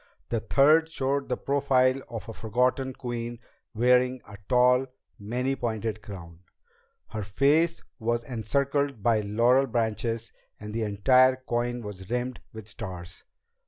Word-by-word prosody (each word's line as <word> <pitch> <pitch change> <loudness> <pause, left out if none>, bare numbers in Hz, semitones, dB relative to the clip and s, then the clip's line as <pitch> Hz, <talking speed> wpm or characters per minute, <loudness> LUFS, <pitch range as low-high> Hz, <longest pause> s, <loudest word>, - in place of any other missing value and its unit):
A 115 - +1
third 150 +8 +4
showed 140 -2 -1
the 125 - 0
profile 135 -2 +2
of 115 -2 -7
a 115 - -6
forgotten 125 +4 0
queen 120 -2 -5 0.4
wearing 125 +2 +3
a 105 - -10
tall, 125 +1 +4 0.3
many 125 +6 -1
pointed 110 -3 -3
crown. 85 -6 -10 0.7
Her 110 - -4
face 145 +11 +2 0.2
was 120 +1 -1
encircled 140 +1 -1
by 115 -1 +3
laurel 120 +6 +3
branches 115 0 -2 0.3
and 105 0 -8
the 115 - -2
entire 125 +5 +4
coin 120 -1 -2
was 95 -2 -8
rimmed 125 +1 -2
with 110 -2 -10
stars. 90 -6 -8
120 Hz, 130 wpm, -27 LUFS, 110-130 Hz, 0.7 s, third